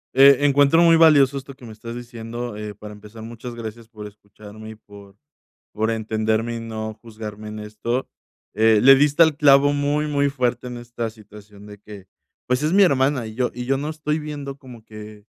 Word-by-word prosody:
Eh, 140 +1 +6
encuentro 145 +2 +4
muy 165 -1 +6
valioso 145 -4 +5
esto 135 0 -12
que 130 -2 -15
me 115 - -10
estás 115 +2 -9
diciendo, 120 -1 -7
eh, 105 -1 -7
para 105 +1 -11
empezar, 105 +2 -13
muchas 120 +1 -9
gracias 115 0 -9
por 105 -3 -10
escucharme 105 +1 -13
y - - -11
por 100 -2 -16 0.6
por 110 +1 -1
entenderme 110 +1 -2
y - - -5
no 110 -1 -6
juzgarme 110 -2 -9
en 105 - -8
esto. 105 +4 -4 0.5
Eh, 110 0 +4
le 135 +2 +8
diste 145 +3 +2
al 160 -2 +1
clavo 145 -1 +4
muy, 145 +1 -1
muy 140 -1 0
fuerte 125 -2 -2
en 125 -1 -7
esta 120 -1 -6
situación 105 -1 -16
de 105 0 -12
que, 105 -2 -13 0.4
pues, 125 +3 0
es 155 - 0
mi 200 +3 +4
hermana 135 -7 +1
y 110 - -10
yo 125 0 -1
y 125 +1 -6
yo 135 +2 0
no 145 +3 -4
estoy 155 -1 -3
viendo 145 -3 -7
como 125 -5 -14
que 105 -1 -12
120 Hz, 200 wpm, -21 LUFS, 110-140 Hz, 0.6 s, le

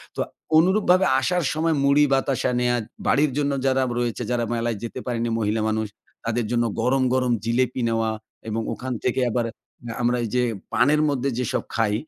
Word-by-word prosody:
তো - - -8 0.4
অনুরূপভাবে 185 +1 +4
আসার 180 -1 0
সময় 160 +1 +1
মুড়ি, 140 +1 +5
বাতাসা 135 -2 +1
নেয়ার 120 -1 +1 0.3
বাড়ির 145 0 +3
জন্য 145 -1 +1
যারা 135 0 +3 0.2
রয়েছে, 120 -2 -2
যারা 120 -1 +1
মেলায় 115 -1 -1
যেতে 115 +2 -5
পারেনি 120 -1 -1
মহিলা 110 +1 0
মানুষ। 110 0 -1 0.4
তাদের 115 0 0
জন্য 120 -1 +2 0.2
গরম, 130 +2 +2
গরম, 125 -1 +2
জিলেপি 125 +2 0
নেওয়া 115 -1 +1 0.4
এবং 110 +1 -1
ওখান 130 0 -4
থেকে 125 - +1
আবার 120 0 0
এ - - -11 0.5
আমরা 120 +1 +2
এই 115 - -3
যে 125 - +3 0.3
পানের 145 +5 +4
মধ্যে 140 -1 0
যেসব 125 -3 -1
খাই, 115 -3 +1
125 Hz, 175 wpm, -23 LUFS, 115-140 Hz, 0.5 s, মুড়ি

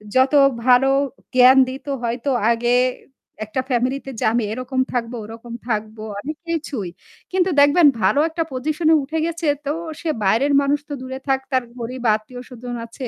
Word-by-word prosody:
যত 260 +2 +4 0.3
ভালো 255 +1 +5 0.5
জ্ঞান 255 +1 +7
দিত 265 +2 -8 0.2
হয়তো 240 +4 -2 0.2
আগে 240 +1 +1 0.7
একটা 215 +5 -2
ফ্যামিলি 250 +2 +1
তে 270 - -6
যে - - -1
আমি 235 0 +1
এরকম 255 +2 -4
থাকবো, 240 -1 -2
ওরকম 230 +2 -10 0.2
থাকবো 215 0 -3 0.2
অনেক 300 +7 -6
কিছুই। 290 - -3 0.4
কিন্তু 370 0 +2
দেখবেন 290 +3 +6
ভালো 210 +9 +3
একটা 330 +1 -2
পজিশন 310 +5 -2
এ - - +7
উঠে 315 +4 -3
গেছে 335 -1 -3 0.2
তো 280 - 0 0.3
সে 330 - -2
বাইরের 235 +9 +2
মানুষ 280 +1 +1
তো - - -4
দূরে 260 +1 -6
থাক। 270 0 +2
তার 260 -1 +2 0.2
গরীব 245 +2 -6
আত্মীয় 245 +4 -8
স্বজন 245 0 -7
আছে। 250 +3 -7
260 Hz, 170 wpm, -21 LUFS, 235-285 Hz, 0.7 s, জ্ঞান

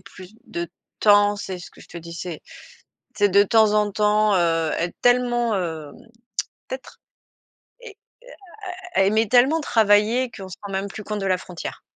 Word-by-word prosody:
plus 185 +1 -14 0.2
de 170 0 -4 0.3
temps, 205 -1 +5
c'est 190 -3 -6
ce - - -11
que - - -19
je - - -14
te 170 - -12
disais. 170 0 -7 0.7
C'est 205 -1 +3
de 200 +2 +5
temps 220 0 +4
en 210 -1 +2
temps, 210 0 +2
heu, 165 -2 +1
être 175 0 -2
tellement, 240 -2 +2
hem, 160 -5 -4 0.7
peut-être - - -8 0.8
et 440 -4 -11 1.0
à - - +3
à - - +6
à - - +5
aimer 220 +2 +2
tellement 260 +8 +4
travailler, 225 0 +3
qu'on 195 -4 -10
se 185 - -10
rend 200 -1 -7
même 195 +1 -3
plus 215 - -8
compte 210 -1 -4
de - - -2
la 185 -1 +1
frontière. 180 -3 -8
205 Hz, 175 wpm, -22 LUFS, 180-220 Hz, 1.0 s, à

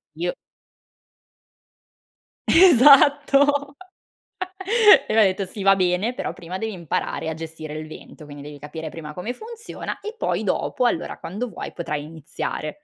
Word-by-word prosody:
"Io" - - -2 2.2
Esatto! 285 -2 +5 1.3
E - - -1
m'ha 225 - +6
detto: 195 0 +1
"Sì, 195 +2 -7
va 195 - +6
bene, 185 +5 0
però - - -4
prima 180 +1 -7
devi 220 +2 -3
imparare 170 -3 -3
a 160 - -2
gestire 160 -1 -8
il 155 0 -7
vento, 155 0 -12
quindi, 145 -1 -11
devi 145 0 -10
capire 160 +2 -7
prima 150 -1 -9
come 180 +8 -4
funziona, 455 - -8
e 430 +2 -7
poi, - - -2
dopo, 250 - 0
allora, 205 - -2
quando 210 +8 -5
vuoi, - - -8
potrai 150 -4 -4
iniziare". 155 0 -5
185 Hz, 140 wpm, -22 LUFS, -, 2.2 s, m'ha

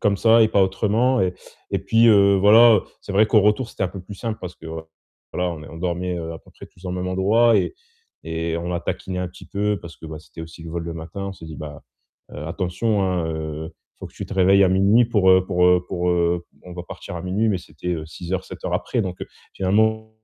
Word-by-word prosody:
comme 100 -1 +2
ça 115 +1 +5
et 110 - +4
pas 100 - +3
autrement 110 +7 +1
et 90 -1 0 0.4
et - - 0
puis, 115 +1 +3
heu, 100 -2 +6
voilà. 110 +2 +7 0.2
C'est 100 - -7
vrai 105 +2 +4
qu'au 110 -1 +4
retour, 105 +4 +1
c'était - - -5
un - - -1
peu 95 +2 -8
plus 100 +3 -10
simple 110 +2 -4
parce 90 -1 -6
que, 80 - -12 0.7
voilà, 90 0 -1
on 75 -2 -9
est - - -11
on 80 +1 -10
dormait, 90 0 -2
heu, 85 0 -5
à - - -8
peu - - -21
près - - -13
tous 90 - -22
au - - -3
même 90 0 -3
endroit 105 +5 +3
et - - 0 0.5
et 80 0 -2
on 85 +1 -5
l'a 85 -1 -2
taquiné 95 0 -4
un 90 - -3
petit 90 - -14
peu 105 0 -1
parce 85 -1 -11
que, - - -14
bah, 80 0 -7
c'était 80 +1 -11
aussi 80 0 -11
le 80 - -8
vol 85 0 -3
le 85 - -5
matin, 95 +5 -6
on - - -5
s'est 80 - -12
dit: 80 -1 -9
«Bah, 75 -2 -8 0.5
heu, - - -8
attention, 95 +5 -1
hein, 90 -3 0
heu, 80 0 -5
il - - -60
faut - - -7
que - - -17
tu - - -6
te - - -8
réveilles 95 +1 +5
à - - +3
0:00 100 +6 +4
pour, 100 -5 +3
heu 95 0 +5
pour, 90 -2 +2
heu 90 0 +4
pour, 90 0 -1
heu 85 0 +1 0.2
on 90 - -10
va 90 - -6
partir 90 - -8
à 85 - -6
0:00.» 100 +5 0
Mais 95 - +1
c'était, 90 +1 -6
heu, 80 -1 -6
6 85 +3 -8
heures, 95 0 -1
7 - - -11
heures - - -1
après, - - -1
donc 90 -2 -5
heu, - - -5 0.3
finalement 110 +3 +1
95 Hz, 265 wpm, -22 LUFS, 85-105 Hz, 0.7 s, voilà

